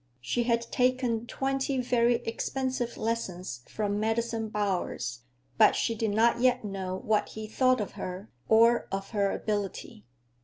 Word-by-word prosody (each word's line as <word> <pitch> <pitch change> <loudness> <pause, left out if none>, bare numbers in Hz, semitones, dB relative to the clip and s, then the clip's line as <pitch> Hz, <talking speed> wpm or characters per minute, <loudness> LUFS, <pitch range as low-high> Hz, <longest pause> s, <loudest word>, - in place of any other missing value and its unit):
She 240 - -1
had 235 -1 +2
taken 250 -2 +1
twenty 270 +1 -1
very 240 -1 +3
expensive 255 +1 -2
lessons 185 - -3
from 205 -1 -2
Madison 225 0 -1
Bowers, 180 - -2 0.4
but - - +7
she 230 - +1
did 225 -1 -1
not 230 +3 +3
yet 250 -2 +3
know 190 -2 -3
what 215 -1 +2
he 220 0 -7
thought 255 +3 +2
of 210 - -3
her 185 +3 -7 0.2
or 230 +2 +5
of 195 0 -4
her 200 -3 +1
ability. 210 +2 -3
225 Hz, 145 wpm, -29 LUFS, 205-240 Hz, 0.4 s, but